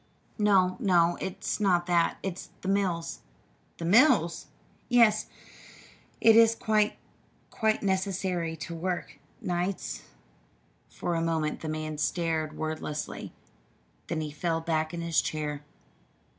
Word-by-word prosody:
"No, 190 -3 +3
no, 175 -6 +3
it's 190 +3 -3
not 180 -4 +2
that; 170 -1 +2
it's 185 -2 -5
the - - -6
mills." 185 -4 0 0.6
"The 165 - -5
mills!" 230 - +4 0.4
"Yes. 230 -3 +4 0.9
Is 225 0 +7
it - - -23
quite 215 -1 +2 0.5
quite 220 -1 0
necessary 190 -3 -1
to 165 +2 -7
work 175 +2 -4 0.2
nights?" 180 +2 -2 0.9
For 175 - -3
a 165 - 0
moment 160 -2 -1
the 160 - -4
man 155 -1 -4
stared 160 -1 -1
wordlessly; 155 -1 -4 0.8
then 160 -2 -2
he 150 -1 -4
fell 165 +2 -1
back 160 -1 -1
in 170 - -5
his 170 -1 +2
chair. 150 -2 -3
175 Hz, 120 wpm, -28 LUFS, 160-195 Hz, 0.9 s, Is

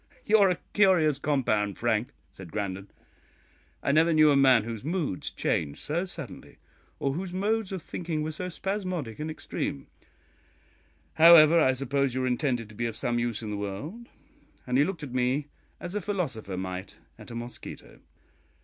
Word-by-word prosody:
"You 220 +1 +5
are 195 -2 +6
a 180 - 0 0.2
curious 175 -8 +4
compound, 110 -9 0
Frank," 115 0 +1 0.2
said 95 -4 -12
Grandon; 100 -1 -4 1.0
"I - - +2
never 160 +3 +4
knew 155 -1 +6
a - - +4
man 130 -5 +5
whose 115 -1 -6
moods 155 - -2
changed 70 - -1
so 170 +5 -2
suddenly, 185 - -10 0.4
or 135 - -1
whose 180 +3 -5
modes 210 +1 0
of 185 -4 -5
thinking 165 -3 -3
were 155 - -2
so 180 +4 -5
spasmodic 185 - -3
and 155 +1 -3
extreme; 70 - -4 1.3
however, 165 0 +8
I 130 -4 +4
suppose 135 0 -1
you 130 - 0
are - - +1
intended 125 -3 0
to 105 - -13
be 120 +2 -1
of 110 -1 -6
some 120 +1 0
use 120 -2 -2
in 105 - -4
the 105 - -3
world" 140 - -6 0.6
and 125 +1 +1
he - - +6
looked 175 -2 -3
at 130 -4 -7
me 130 +3 0 0.3
as 175 - -6
a 210 - -1
philosopher 135 - -3
might 95 0 -5 0.2
at - - -12
a 115 - -8
mosquito. 120 +1 -9
140 Hz, 175 wpm, -28 LUFS, 115-170 Hz, 1.3 s, however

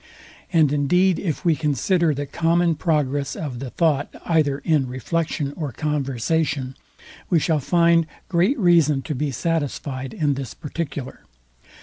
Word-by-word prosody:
And 155 -5 +4
indeed 180 +6 +2
if 170 0 -3
we 165 -2 +4
consider 160 - +1
the 145 0 -3
common 170 +3 +1
progress 145 -4 0
of 135 -6 -5
the 135 -1 -5
thought, 150 -1 +1 0.2
either 155 -5 +2
in 145 -3 +1
reflection 145 +2 -2
or 150 -5 -4
conversation, 140 0 -1 0.5
we 175 - +4
shall 160 0 +1
find 170 +2 +3 0.2
great 190 +10 +2
reason 165 - +3
to 155 - -3
be 145 +2 -1
satisfyed 135 -3 -3
in 145 -3 +1
this 135 -2 -6
particular. 145 -4 -6
150 Hz, 135 wpm, -22 LUFS, 140-165 Hz, 0.5 s, And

